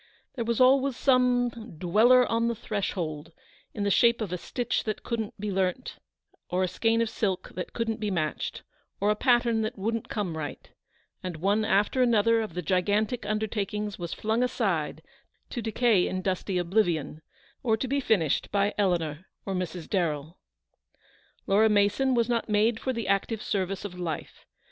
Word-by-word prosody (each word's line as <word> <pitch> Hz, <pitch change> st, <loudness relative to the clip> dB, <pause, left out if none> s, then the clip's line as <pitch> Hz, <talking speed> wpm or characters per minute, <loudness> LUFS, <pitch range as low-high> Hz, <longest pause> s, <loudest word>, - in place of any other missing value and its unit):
There 235 Hz, -4 st, -3 dB
was 235 Hz, 0 st, 0 dB
always 265 Hz, 0 st, +4 dB
some 245 Hz, -, +1 dB
"Dweller 225 Hz, +9 st, +5 dB
on 230 Hz, 0 st, +1 dB
the 235 Hz, -, 0 dB
Threshold" 170 Hz, -8 st, -3 dB, 0.4 s
in 205 Hz, -, -4 dB
the 200 Hz, -, +1 dB
shape 235 Hz, +3 st, +4 dB
of 205 Hz, -5 st, -3 dB
a -, -, +1 dB
272 -, -, -14 dB, 0.3 s
stitch, -, -, -4 dB
that 215 Hz, -2 st, -3 dB
couldn't 225 Hz, -3 st, -4 dB
be 210 Hz, 0 st, -3 dB
learnt, 190 Hz, +5 st, -1 dB, 0.5 s
or 185 Hz, +1 st, +1 dB
a -, -, +1 dB
skein 225 Hz, +5 st, +1 dB
of 225 Hz, -, -3 dB
silk 190 Hz, -4 st, -2 dB
that 180 Hz, -, -6 dB
couldn't 225 Hz, -2 st, -2 dB
be 210 Hz, -1 st, -1 dB
matched, 155 Hz, -6 st, -2 dB, 0.4 s
or 205 Hz, +2 st, +2 dB
a -, -, +1 dB
pattern 240 Hz, -1 st, +3 dB
that 220 Hz, +2 st, -3 dB
wouldn't 225 Hz, +3 st, -2 dB
come 195 Hz, -7 st, -2 dB
right; 155 Hz, -2 st, -6 dB, 0.5 s
and 180 Hz, -2 st, -5 dB
one 200 Hz, +6 st, +1 dB
after 210 Hz, +5 st, +2 dB
another 230 Hz, -1 st, +4 dB
of 215 Hz, -7 st, -6 dB
the 180 Hz, -, -3 dB
gigantic 205 Hz, +7 st, 0 dB
undertakings 210 Hz, -1 st, -2 dB
was 170 Hz, -1 st, -5 dB
flung 220 Hz, +2 st, -1 dB
aside 185 Hz, -11 st, -1 dB, 0.5 s
to 240 Hz, -, -3 dB
decay 225 Hz, -3 st, +2 dB
in 185 Hz, 0 st, -3 dB
dusty 190 Hz, 0 st, -1 dB
oblivion, 175 Hz, -5 st, 0 dB, 0.4 s
or 225 Hz, -3 st, +2 dB
to 260 Hz, -, -3 dB
be 280 Hz, +3 st, 0 dB
finished 190 Hz, -, +1 dB
by 200 Hz, 0 st, +1 dB
Eleanor 175 Hz, -4 st, 0 dB, 0.2 s
or 195 Hz, -, -2 dB
Mrs. 180 Hz, -2 st, -4 dB
Darrell. 165 Hz, -3 st, -2 dB, 1.1 s
Laura 215 Hz, +3 st, +4 dB
Mason 210 Hz, +6 st, +3 dB
was 235 Hz, -1 st, +2 dB
not 235 Hz, -2 st, -1 dB
made 215 Hz, +2 st, +2 dB
for 260 Hz, -, -1 dB
the 230 Hz, -3 st, -4 dB
active 200 Hz, +3 st, 0 dB
ser 190 Hz, -3 st, 0 dB
vice 195 Hz, +2 st, -5 dB
of 180 Hz, -3 st, -7 dB
life. 165 Hz, -4 st, -5 dB
210 Hz, 175 wpm, -27 LUFS, 185-230 Hz, 1.1 s, Dweller